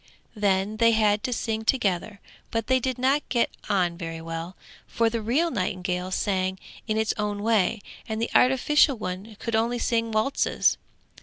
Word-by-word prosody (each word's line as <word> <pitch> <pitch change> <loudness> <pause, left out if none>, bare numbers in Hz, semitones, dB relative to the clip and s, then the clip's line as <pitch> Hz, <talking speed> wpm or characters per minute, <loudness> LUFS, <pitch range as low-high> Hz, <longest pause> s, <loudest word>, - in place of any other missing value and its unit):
Then 200 0 +1
they 230 0 +5
had 210 -1 +3
to 250 - -2
sing 220 -1 -2
together, 205 -4 0 0.3
but 225 -1 -2
they 260 +1 +3
did 255 0 -2
not 265 +3 +2
get 240 -3 +1 0.2
on 180 -4 +1
very 165 -2 -5
well, 165 +2 -6 0.3
for 230 -1 +1
the 230 -1 -2
real 285 +10 +1
nightingale 185 -2 -2
sang 190 -1 -1 0.3
in 215 -1 0
its 220 0 +1
own 205 -1 -2
way, 220 -1 +2 0.3
and 220 0 -2
the 230 - -2
artificial 265 +2 +4
one 195 +2 -6
could 230 -1 -2
only 230 +2 +1
sing 230 -1 0
waltzes. 215 +6 +1
220 Hz, 165 wpm, -25 LUFS, 190-235 Hz, 0.3 s, they